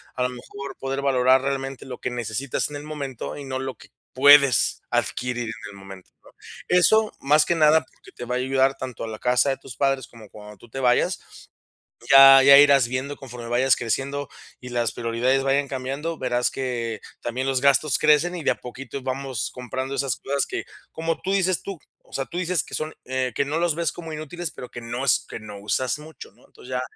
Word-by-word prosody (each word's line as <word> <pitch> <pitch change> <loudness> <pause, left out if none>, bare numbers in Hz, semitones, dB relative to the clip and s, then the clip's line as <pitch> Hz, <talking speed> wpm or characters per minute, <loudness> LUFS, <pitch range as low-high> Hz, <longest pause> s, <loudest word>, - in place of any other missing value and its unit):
a 125 - -1
lo 125 - +1
mejor 135 +2 -9
poder 135 +1 -3
valorar 130 -1 +4
realmente 135 -1 -3
lo 125 -2 -8
que - - -3
necesitas 120 +4 -3
en 150 - -8
el 145 - -9
momento 145 -4 -6
y 145 - -8
no 130 -1 -4
lo 130 -1 -4
que - - -17 0.2
puedes 140 -2 +6
adquirir 120 -1 -1
en 110 -1 -7
el - - -13
momento, 95 -1 -12
¿no? - - -17 0.4
Eso, 215 +5 +4
más 150 +2 +4
que 175 - +1
nada, 155 0 +5
porque - - -19
te 120 - -8
va 125 +1 -2
a - - +1
ayudar 135 +1 +2
tanto 130 -4 -6
a - - -4
la 110 -1 -7
casa 125 +2 +2
de 135 - -1
tus 130 -3 -11
padres 135 -2 0
como 110 -3 -15
cuando 105 0 -12
tú 120 - -17
te 135 - -6
vayas. 125 -1 +2 0.9
Ya 135 0 +10
ya 140 0 +9
irás 140 -4 +6
viendo 130 +3 -4
conforme 120 -3 -9
vayas 125 +2 +3
creciendo 135 +4 -3 0.3
y 125 - -8
las 120 -1 -1
prioridades 120 +4 0
vayan 140 +1 +1
cambiando, 135 +5 -4
verás 125 -1 0
que 120 -4 -3 0.2
también 125 +2 -3
los 135 -1 +1
gastos 140 0 +3
crecen 155 +4 +3
y 165 - -6
de - - +3
a - - -1
poquito 135 +2 -8
vamos 130 -3 -3
comprando 130 +2 -5
esas 135 -3 0
cosas 140 +1 -1
que, 385 +1 -4 0.3
como 165 0 -2
tú 190 - -1
dices 185 -2 +1
tú, 195 -2 -6 0.3
o - - -23
sea, 135 - -1
tú 175 - -8
dices 180 -1 0
que - - -14
son, 155 0 -4
eh, 130 -1 -2
que - - +2
no 155 +4 -2
los 170 -3 +1
ves 170 0 -1
como 165 -2 -8
inútiles, 155 +2 -5
pero 125 - -9
que - - -7
no 120 +2 -4
es 140 - +2
que - - -6
no 105 -2 -9
usas 130 +6 -1
mucho, 155 +1 -12
¿no? - - -24
Entonces, 130 - -14
ya, 125 - -1
135 Hz, 220 wpm, -24 LUFS, 125-145 Hz, 0.9 s, Ya